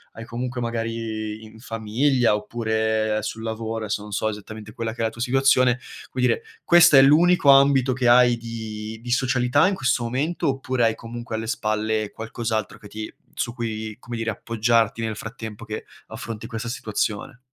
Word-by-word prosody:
hai 115 Hz, -, -8 dB
comunque, 125 Hz, +2 st, -4 dB
magari 115 Hz, -2 st, -3 dB
in 110 Hz, 0 st, -13 dB
famiglia 115 Hz, +2 st, +1 dB
oppure 110 Hz, 0 st, -1 dB
sul 110 Hz, -, -5 dB
lavoro, 110 Hz, 0 st, -4 dB
adesso 105 Hz, 0 st, -2 dB
non 105 Hz, -, -10 dB
so 110 Hz, +2 st, 0 dB
esattamente 105 Hz, 0 st, -8 dB
quella 115 Hz, +1 st, -4 dB
che 115 Hz, -, -6 dB
è -, -, +2 dB
la -, -, +1 dB
tua 115 Hz, +1 st, -10 dB
situazione 130 Hz, -1 st, +3 dB, 0.3 s
cui 130 Hz, -, -3 dB
dire 125 Hz, -, +2 dB, 0.2 s
questo 175 Hz, -4 st, +7 dB
è -, -, +10 dB
l'unico 155 Hz, +3 st, +5 dB
ambito 135 Hz, -1 st, +6 dB
che 125 Hz, -1 st, 0 dB
hai 120 Hz, 0 st, +6 dB
di 110 Hz, -1 st, -6 dB
di 120 Hz, -, -8 dB
socialità 125 Hz, +4 st, +3 dB
in 200 Hz, -, +1 dB
questo 125 Hz, -7 st, 0 dB
momento? 145 Hz, +8 st, -1 dB
Oppure 130 Hz, -2 st, -1 dB
hai 115 Hz, -, +3 dB
comunque 120 Hz, 0 st, -7 dB
alle 110 Hz, 0 st, -4 dB
spalle 110 Hz, -1 st, -1 dB
qualcos'altro 110 Hz, -1 st, -3 dB
che 105 Hz, -, -13 dB
ti 110 Hz, +1 st, -7 dB, 0.2 s
su 120 Hz, -, -3 dB
cui, 110 Hz, -2 st, -4 dB
come 120 Hz, -1 st, -7 dB
dire, 115 Hz, 0 st, -2 dB
appoggiarti 115 Hz, +1 st, +1 dB
nel 110 Hz, -1 st, -2 dB
frattempo 110 Hz, 0 st, -8 dB
che 110 Hz, -1 st, -6 dB, 0.2 s
affronti 115 Hz, -1 st, -7 dB
questa 115 Hz, 0 st, -5 dB
situazione? 110 Hz, +1 st, -3 dB
115 Hz, 175 wpm, -23 LUFS, 110-125 Hz, 0.3 s, è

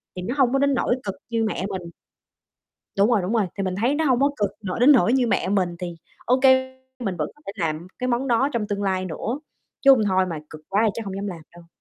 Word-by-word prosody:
Thì 180 Hz, -, -5 dB
nó 240 Hz, +9 st, -3 dB
hông 260 Hz, -2 st, +3 dB
có 275 Hz, -, +3 dB
đến 280 Hz, 0 st, +3 dB
nỗi 245 Hz, 0 st, +1 dB
cực 195 Hz, -2 st, -4 dB
như 230 Hz, -1 st, 0 dB
mẹ 195 Hz, -3 st, -2 dB
mình. 180 Hz, -3 st, -5 dB, 1.1 s
Đúng 200 Hz, +4 st, +4 dB
rồi, 210 Hz, -5 st, +3 dB
đúng 190 Hz, +6 st, -2 dB
rồi, 210 Hz, -5 st, +2 dB
thì 195 Hz, -, -1 dB
mình 185 Hz, -1 st, -2 dB
thấy 265 Hz, +5 st, +2 dB
nó 320 Hz, 0 st, 0 dB
hông 255 Hz, -2 st, +3 dB
có 280 Hz, +1 st, +4 dB
cực 205 Hz, -2 st, +1 dB
nỗi 185 Hz, +4 st, -3 dB
đến 265 Hz, +5 st, +7 dB
nỗi 250 Hz, -2 st, +5 dB
như 255 Hz, -3 st, +2 dB
mẹ 195 Hz, -, +1 dB
mình, 185 Hz, -4 st, 0 dB
thì 175 Hz, -2 st, -5 dB, 0.3 s
OK, 255 Hz, +2 st, +2 dB, 0.6 s
mình 195 Hz, -7 st, -2 dB
vẫn 150 Hz, -, -2 dB
có 295 Hz, -, -24 dB
thể -, -, -3 dB
làm 155 Hz, +3 st, -3 dB
cái 250 Hz, -, -1 dB
món 250 Hz, +2 st, 0 dB
đó 250 Hz, +4 st, +2 dB
trong 215 Hz, -3 st, -1 dB
tương 205 Hz, -1 st, -2 dB
lai 185 Hz, -1 st, 0 dB
nữa, 230 Hz, -, -4 dB, 0.4 s
chứ 275 Hz, -, +8 dB
hông 235 Hz, -5 st, +5 dB
thôi 190 Hz, -1 st, +2 dB
mà 165 Hz, -4 st, -4 dB
cực 155 Hz, -1 st, -11 dB
quá 205 Hz, +2 st, +2 dB
thì -, -, +3 dB
chắc 225 Hz, -, -6 dB
hông 195 Hz, -1 st, -5 dB
dám 200 Hz, +1 st, -4 dB
làm 170 Hz, -4 st, -6 dB
đâu. 170 Hz, -1 st, -15 dB
205 Hz, 270 wpm, -23 LUFS, 185-250 Hz, 1.1 s, chứ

